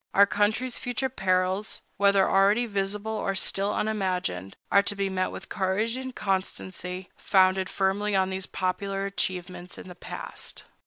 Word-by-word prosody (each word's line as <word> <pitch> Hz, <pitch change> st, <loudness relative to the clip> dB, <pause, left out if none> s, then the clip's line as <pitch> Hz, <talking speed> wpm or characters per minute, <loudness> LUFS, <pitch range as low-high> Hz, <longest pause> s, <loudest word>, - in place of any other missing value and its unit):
Our 200 Hz, -, +8 dB
country's 215 Hz, +5 st, 0 dB
future 245 Hz, +2 st, -1 dB
perils, 185 Hz, -2 st, 0 dB, 0.2 s
whether 200 Hz, -1 st, +5 dB
already 200 Hz, +5 st, +4 dB
visible 205 Hz, 0 st, -2 dB
or 195 Hz, -3 st, -1 dB
still 195 Hz, +1 st, 0 dB
unimagined, 180 Hz, -, -1 dB
are 200 Hz, -, +7 dB
to 200 Hz, +1 st, -1 dB
be 195 Hz, -1 st, -1 dB
met 185 Hz, 0 st, 0 dB
with -, -, -8 dB
courage 205 Hz, +4 st, 0 dB
and 260 Hz, 0 st, -5 dB
constancy 185 Hz, -1 st, -2 dB
founded 190 Hz, -1 st, +3 dB
firmly 200 Hz, +1 st, +1 dB
on 190 Hz, 0 st, +2 dB
these 190 Hz, 0 st, -2 dB
popular 195 Hz, +1 st, -2 dB
achievements 180 Hz, -1 st, -3 dB
in -, -, -9 dB
the 180 Hz, -, -8 dB
past. -, -, -7 dB
195 Hz, 150 wpm, -27 LUFS, 185-205 Hz, 0.2 s, Our